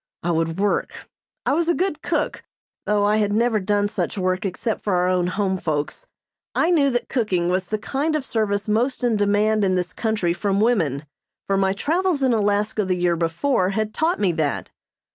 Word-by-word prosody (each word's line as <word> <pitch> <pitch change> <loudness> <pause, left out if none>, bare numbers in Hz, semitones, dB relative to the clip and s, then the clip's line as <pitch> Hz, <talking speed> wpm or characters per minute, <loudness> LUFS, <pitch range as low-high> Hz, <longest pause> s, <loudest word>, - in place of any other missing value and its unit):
I 175 - 0
would 165 +1 -1
work. 205 0 -1 0.4
I - - +2
was 335 +2 +1
a 340 - +3
good 355 -5 -1
cook, - - -1 0.5
though 205 -1 +2
I 210 +1 +3
had 205 -1 +1
never 225 +1 +2
done 205 +1 +1
such 205 - -3
work 185 +1 0
except 215 +4 -3
for 200 -3 0
our 180 0 +2
own 180 -1 +1
home 190 0 -1
folks. 155 - -3 0.5
I 330 - +2
knew 290 -5 +4
that 245 -2 -1
cooking 190 -9 0
was 185 0 0
the 215 - -1
kind 280 +8 -1
of 295 -3 -2
service 205 -4 -1
most 245 +5 0
in 240 -2 +2
demand 205 +1 +2
in 185 -1 +2
this 180 -1 -2
country 215 -7 0
from 195 +2 0
women, 165 - +1 0.4
for 195 - 0
my 195 0 +2
travels 325 - 0
in 255 -2 +3
Alaska 210 0 +1
the 185 -1 0
year 175 -1 +2
before 180 - 0
had 215 0 -1
taught 330 +3 0
me 195 -4 +2
that. 155 -4 -2
205 Hz, 200 wpm, -22 LUFS, 185-235 Hz, 0.5 s, knew